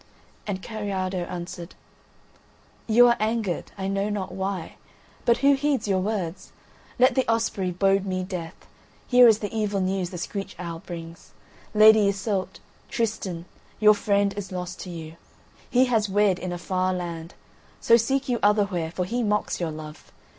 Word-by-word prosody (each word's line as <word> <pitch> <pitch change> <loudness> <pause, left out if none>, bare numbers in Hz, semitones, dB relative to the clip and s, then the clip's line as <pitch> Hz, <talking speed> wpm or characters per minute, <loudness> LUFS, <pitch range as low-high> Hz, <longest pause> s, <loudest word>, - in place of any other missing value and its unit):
And 190 -2 -3
Kariado 190 -5 -3
answered: 175 0 -7 1.1
"You 235 +2 +6
are 240 0 +4
angered, 215 -4 -1
I 190 0 -3
know 195 +1 -1
not 205 -3 -3
why, 190 -2 -4 0.5
but 235 - +4
who 280 - +7
heeds 275 -4 0
your 190 -2 +2
words? 190 -3 -3 0.5
Let 255 +1 +5
the 260 -4 +1
Osprey 225 -4 0
bode 195 +2 +1
me 185 -1 -1
death; 180 -3 -6 0.5
here 245 -1 +7
is 220 -2 +6
the 210 +1 -5
evil 210 -2 0
news 185 -1 -1
the 180 - -7
screech 195 +3 -5
owl 170 -2 -6
brings. 165 -1 -10 0.4
Lady 215 -1 +7
Iseult, 195 -1 -2 0.3
Tristan, 200 -7 -2 0.3
your 210 0 +7
friend 200 -1 +1
is 205 -2 -6
lost 180 0 -5
to 185 - -7
you. 165 -1 -8 0.5
He 255 +1 +4
has 225 -5 +1
wed 200 -2 +2
in 185 - -4
a 175 - -3
far 185 +1 -1
land. 170 -1 -6 0.4
So 230 - +5
seek 265 +4 +1
you 245 -2 0
other 205 0 +4
where, 175 -5 -3
for 180 +2 -3
he 240 +6 -2
mocks 210 -2 0
your 170 - -1
love. 155 -1 -9
195 Hz, 165 wpm, -25 LUFS, 180-215 Hz, 1.1 s, who